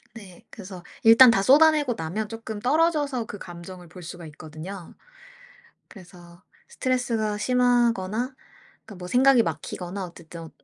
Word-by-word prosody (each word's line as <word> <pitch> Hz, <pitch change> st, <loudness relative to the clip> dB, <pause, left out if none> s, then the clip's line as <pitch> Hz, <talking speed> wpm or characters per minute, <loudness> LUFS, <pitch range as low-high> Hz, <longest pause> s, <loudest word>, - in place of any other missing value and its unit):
네. 190 Hz, -6 st, -13 dB
그래서 185 Hz, -3 st, -10 dB, 0.2 s
일단 230 Hz, +3 st, +8 dB
다 225 Hz, -4 st, +3 dB
쏟아 295 Hz, +9 st, +6 dB
내고 290 Hz, -5 st, -1 dB
나면 195 Hz, +6 st, -4 dB
쪼끔 225 Hz, -1 st, -7 dB
떨어져서 290 Hz, -3 st, +1 dB
그 205 Hz, -, -8 dB
감정을 175 Hz, -1 st, -11 dB
볼 180 Hz, +2 st, -12 dB
수가 170 Hz, 0 st, -9 dB
있거든요. 155 Hz, +4 st, -10 dB, 0.9 s
그래서 175 Hz, -2 st, -16 dB, 0.2 s
스트레스가 230 Hz, -5 st, -2 dB
심하거나 245 Hz, -1 st, +1 dB, 0.5 s
그러니까 215 Hz, -, -12 dB
뭐 180 Hz, -, -7 dB
생각이 255 Hz, +3 st, +4 dB
막히거나 185 Hz, -3 st, -5 dB
어쨌든 170 Hz, -1 st, -11 dB
210 Hz, 320 characters per minute, -24 LUFS, 180-245 Hz, 0.9 s, 일단